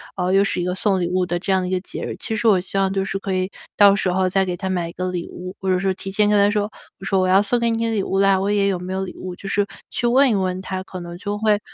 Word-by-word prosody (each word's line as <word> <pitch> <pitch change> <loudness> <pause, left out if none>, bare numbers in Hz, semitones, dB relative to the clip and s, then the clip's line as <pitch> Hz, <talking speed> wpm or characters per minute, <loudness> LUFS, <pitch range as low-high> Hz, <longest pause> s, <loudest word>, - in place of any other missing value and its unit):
哦， 180 -1 -1
又 195 - +5
是 195 -2 0
一 - - -1
个 180 +1 -1
送 190 0 +1
礼 175 - 0
物 185 0 +1
的 175 0 -1
这 195 +3 -3
样 190 -1 +3
的 180 - -3
一 - - -4
个 185 -1 0
节 - - -7
日。 - - -4
其 - - -3
实 220 +1 0
我 205 -4 +6
希 185 +2 -3
望 195 0 +2
就 195 -1 0
是 195 0 -3
可 195 -1 -3
以 185 +1 -1 0.2
到 200 -1 +7
时 200 -2 0
候 185 +1 +1
再 190 +1 +2
给 180 -1 -2
他 190 +2 -4
买 175 -2 -1
一 170 - -9
个 185 +1 -3
礼 175 -2 -4
物， 180 +1 -8
或 190 - -3
者 185 - +3
是 190 +1 0
提 195 - -7
前 210 +1 +3
跟 210 - +4
他 200 0 +5
说， 210 0 -1 0.3
我 - - -13
说： 195 0 +1
“我 185 - +2
要 190 +2 +5
送 240 +4 +1
给 235 0 +1
你 230 0 0
的 - - -1
礼 205 -3 0
物 195 - -1
了， 195 -1 +4
我 200 - 0
也 200 -1 +2
有 185 -2 -1
没 180 +1 -5
有 190 0 -1
礼 185 - -6
物？” 185 -1 -6
就 195 - -8
是 205 0 +2 0.2
去 240 - -1
问 265 +3 +5
一 - - +2
问 185 -2 -1
他， 190 0 -4
可 185 -1 -8
能 175 0 -8
就 205 +2 -4
会 210 -1 +2
190 Hz, 375 characters per minute, -21 LUFS, 185-205 Hz, 0.3 s, 到